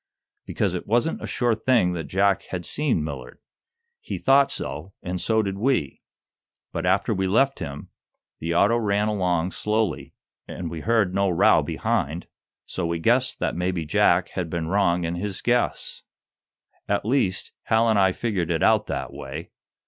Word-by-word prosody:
"Because -, -, -1 dB
it -, -, -5 dB
wasn't 120 Hz, +9 st, +1 dB
a -, -, -5 dB
sure 120 Hz, -2 st, +1 dB
thing 110 Hz, -5 st, +2 dB
that 85 Hz, -2 st, -4 dB
Jack 100 Hz, +1 st, +2 dB
had 90 Hz, -2 st, -4 dB
seen 140 Hz, -, 0 dB
Millard. 65 Hz, -5 st, -7 dB, 0.6 s
He 455 Hz, -, -5 dB
thought 135 Hz, +1 st, +4 dB
so, 80 Hz, +7 st, -5 dB
and 90 Hz, 0 st, -3 dB
so 110 Hz, +4 st, +2 dB
did 100 Hz, -1 st, -4 dB
we. 110 Hz, -, 0 dB, 0.7 s
But, -, -, -3 dB
after -, -, +2 dB
we 95 Hz, 0 st, 0 dB
left 135 Hz, +8 st, +2 dB
him, 75 Hz, -5 st, -7 dB, 0.5 s
the 85 Hz, +1 st, -2 dB
auto 105 Hz, +6 st, +4 dB
ran 105 Hz, -1 st, +1 dB
along 90 Hz, -4 st, 0 dB
slowly, 105 Hz, -5 st, -2 dB, 0.3 s
and 85 Hz, -3 st, -6 dB
we 85 Hz, -, -5 dB
heard 110 Hz, -3 st, +2 dB
no 100 Hz, 0 st, +2 dB
row 85 Hz, -, +4 dB
behind, 80 Hz, +5 st, -2 dB, 0.4 s
so 90 Hz, -2 st, -3 dB
we 85 Hz, 0 st, -1 dB
guessed 120 Hz, +9 st, +2 dB
that -, -, 0 dB
maybe 90 Hz, -1 st, -1 dB
Jack 75 Hz, -, +3 dB
had 90 Hz, -3 st, -4 dB
been 80 Hz, -1 st, -3 dB
wrong 90 Hz, -2 st, +2 dB
in 85 Hz, 0 st, -2 dB
his 95 Hz, +2 st, -3 dB
guess. 120 Hz, 0 st, -1 dB, 0.9 s
At 100 Hz, 0 st, 0 dB
least, 110 Hz, -6 st, 0 dB
Hal 110 Hz, +1 st, +3 dB
and 110 Hz, -2 st, +3 dB
I 95 Hz, -1 st, +4 dB
figured 95 Hz, -5 st, -2 dB
it 80 Hz, -2 st, 0 dB
out -, -, +3 dB
that -, -, -4 dB
way. 75 Hz, +6 st, -7 dB
95 Hz, 170 wpm, -24 LUFS, 85-110 Hz, 0.9 s, thought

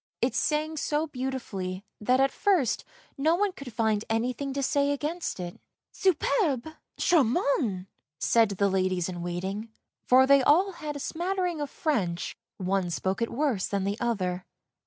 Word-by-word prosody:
It -, -, +1 dB
sang 310 Hz, +1 st, 0 dB
so 300 Hz, +1 st, 0 dB
beautifully 240 Hz, -9 st, -4 dB
that 250 Hz, +4 st, +2 dB
at 270 Hz, 0 st, +4 dB
first 360 Hz, -, +1 dB, 0.4 s
no 315 Hz, +4 st, +3 dB
one 405 Hz, +2 st, +1 dB
could 275 Hz, -8 st, -9 dB
find 220 Hz, -2 st, +1 dB
anything 250 Hz, +5 st, -1 dB
to 275 Hz, 0 st, -2 dB
say 280 Hz, +1 st, +2 dB
against 300 Hz, -, -2 dB
it. 175 Hz, -1 st, -6 dB, 0.2 s
" -, -, -65 dB
Superbe! 360 Hz, -, +2 dB, 0.3 s
charmant! 255 Hz, -, +2 dB, 0.2 s
" 140 Hz, -, -64 dB
said 230 Hz, -2 st, +4 dB
the 200 Hz, -, +3 dB
ladies 185 Hz, -2 st, +1 dB
in 175 Hz, -1 st, -5 dB
waiting, 190 Hz, +5 st, -4 dB, 0.4 s
for 260 Hz, +1 st, +7 dB
they 280 Hz, 0 st, +6 dB
all 350 Hz, +9 st, +4 dB
had 305 Hz, -4 st, -6 dB
a -, -, -5 dB
smattering 355 Hz, +1 st, -2 dB
of 290 Hz, -, -3 dB
French, 190 Hz, -, -1 dB, 0.2 s
one 190 Hz, -1 st, 0 dB
spoke 190 Hz, +5 st, -2 dB
it 230 Hz, -, 0 dB
worse 250 Hz, -7 st, 0 dB
than 200 Hz, -1 st, -1 dB
the 200 Hz, +2 st, -2 dB
other. 185 Hz, -6 st, -1 dB
255 Hz, 160 wpm, -28 LUFS, 195-300 Hz, 0.4 s, for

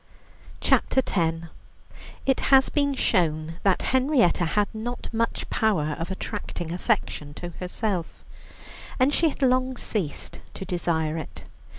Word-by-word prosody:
CHAPTER 265 Hz, -, +3 dB
X 165 Hz, -2 st, 0 dB, 0.8 s
It 270 Hz, -1 st, +2 dB
has 270 Hz, -1 st, +6 dB
been 285 Hz, -2 st, +1 dB
shown 165 Hz, -7 st, +1 dB
that 195 Hz, -2 st, +2 dB
Henrietta 260 Hz, -, +3 dB
had 205 Hz, +5 st, +1 dB
not 240 Hz, +3 st, -5 dB
much 230 Hz, +1 st, -1 dB
power 155 Hz, -9 st, +1 dB
of 165 Hz, -, -3 dB
attracting 190 Hz, -3 st, -5 dB
affection 175 Hz, -6 st, -1 dB
to 175 Hz, -, -6 dB
herself, 185 Hz, -1 st, -3 dB, 0.7 s
and 265 Hz, +3 st, +4 dB
she 325 Hz, +1 st, +4 dB
had 280 Hz, -, -5 dB
long 255 Hz, 0 st, +2 dB
ceased 180 Hz, -10 st, -3 dB, 0.2 s
to 190 Hz, -, -6 dB
desire 165 Hz, -3 st, -1 dB
it. 155 Hz, -, -9 dB
195 Hz, 125 wpm, -25 LUFS, 165-255 Hz, 0.8 s, has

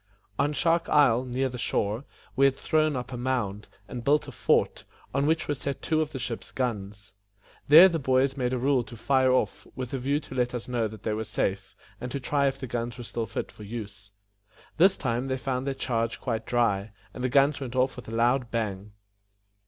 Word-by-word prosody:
On 145 Hz, -, +2 dB
Shark 165 Hz, +2 st, +1 dB
Isle, 130 Hz, -4 st, +4 dB
near 130 Hz, +2 st, -1 dB
the 125 Hz, -1 st, -6 dB
shore, 110 Hz, +4 st, -1 dB, 0.3 s
we 135 Hz, -, +4 dB
had 135 Hz, -1 st, +4 dB
thrown 155 Hz, +1 st, +1 dB
up 125 Hz, 0 st, -5 dB
a -, -, -4 dB
mound, 120 Hz, -5 st, -2 dB, 0.2 s
and 120 Hz, -2 st, -6 dB
built 145 Hz, +3 st, +2 dB
a -, -, -7 dB
fort, -, -, +1 dB, 0.3 s
on 140 Hz, +2 st, +1 dB
which 160 Hz, +1 st, +1 dB
were 145 Hz, -, +1 dB
set 140 Hz, 0 st, -5 dB
two 160 Hz, -1 st, +1 dB
of 155 Hz, -1 st, -2 dB
the -, -, -5 dB
ship's 120 Hz, -2 st, -5 dB
guns. 105 Hz, -5 st, -4 dB, 0.6 s
These 170 Hz, +5 st, +10 dB
the 165 Hz, -, -1 dB
boys 130 Hz, 0 st, +2 dB
made 125 Hz, -3 st, -1 dB
a 130 Hz, -, 0 dB
rule 130 Hz, 0 st, +2 dB
to 115 Hz, +2 st, -11 dB
fire 130 Hz, +1 st, +3 dB
off, 130 Hz, -, 0 dB
with 130 Hz, -1 st, -5 dB
a 135 Hz, -, -1 dB
view 140 Hz, +4 st, 0 dB
to 145 Hz, -, -11 dB
let 125 Hz, -1 st, 0 dB
us 120 Hz, -, -5 dB
know 120 Hz, -3 st, 0 dB
that 110 Hz, -1 st, -11 dB
they 110 Hz, -, -1 dB
were 110 Hz, +1 st, -2 dB
safe, 95 Hz, -2 st, -2 dB, 0.3 s
and 125 Hz, -, -5 dB
to 140 Hz, -, -2 dB
try 140 Hz, +2 st, +1 dB
if 135 Hz, 0 st, -2 dB
the 135 Hz, -, -4 dB
guns 120 Hz, 0 st, -4 dB
were 120 Hz, -, -7 dB
still 115 Hz, 0 st, -4 dB
fit 110 Hz, -, -4 dB
for -, -, -15 dB
use. 105 Hz, -2 st, -8 dB, 0.7 s
This 185 Hz, +4 st, +5 dB
time 125 Hz, -1 st, -1 dB
they 130 Hz, 0 st, -1 dB
found 130 Hz, 0 st, -2 dB
their 135 Hz, -, -1 dB
charge 115 Hz, -3 st, -1 dB
quite 115 Hz, -3 st, -3 dB
dry, 105 Hz, -4 st, +1 dB, 0.2 s
and 125 Hz, -, -6 dB
the 130 Hz, -, +1 dB
guns 140 Hz, +2 st, +3 dB
went 130 Hz, -3 st, -6 dB
off 130 Hz, +1 st, +2 dB
with 125 Hz, -, -10 dB
a -, -, -7 dB
loud 120 Hz, +2 st, +2 dB
bang. 105 Hz, -3 st, -3 dB
125 Hz, 225 wpm, -27 LUFS, 115-135 Hz, 0.7 s, These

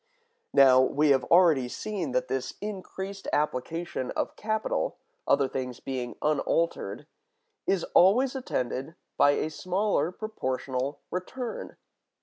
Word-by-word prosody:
Now 130 Hz, -2 st, +8 dB
we 145 Hz, +3 st, +2 dB
have 135 Hz, -2 st, +4 dB
already 165 Hz, -8 st, +5 dB
seen 185 Hz, -2 st, -4 dB
that 125 Hz, 0 st, +1 dB
this 130 Hz, 0 st, -3 dB
increased 195 Hz, -1 st, -6 dB
application 150 Hz, 0 st, -1 dB
of -, -, -2 dB
capital, 220 Hz, 0 st, -1 dB, 0.3 s
other 140 Hz, -, +4 dB
things 125 Hz, -2 st, -4 dB
being 125 Hz, -3 st, -4 dB
unaltered, 150 Hz, -5 st, 0 dB, 0.6 s
is 195 Hz, -3 st, +2 dB
always 245 Hz, +9 st, +5 dB
attended 135 Hz, -, -3 dB, 0.2 s
with 145 Hz, 0 st, +5 dB
a 155 Hz, -, -1 dB
smaller 180 Hz, 0 st, 0 dB
proportional 135 Hz, -, -3 dB
return. 230 Hz, +7 st, -5 dB
155 Hz, 115 wpm, -28 LUFS, 130-190 Hz, 0.6 s, Now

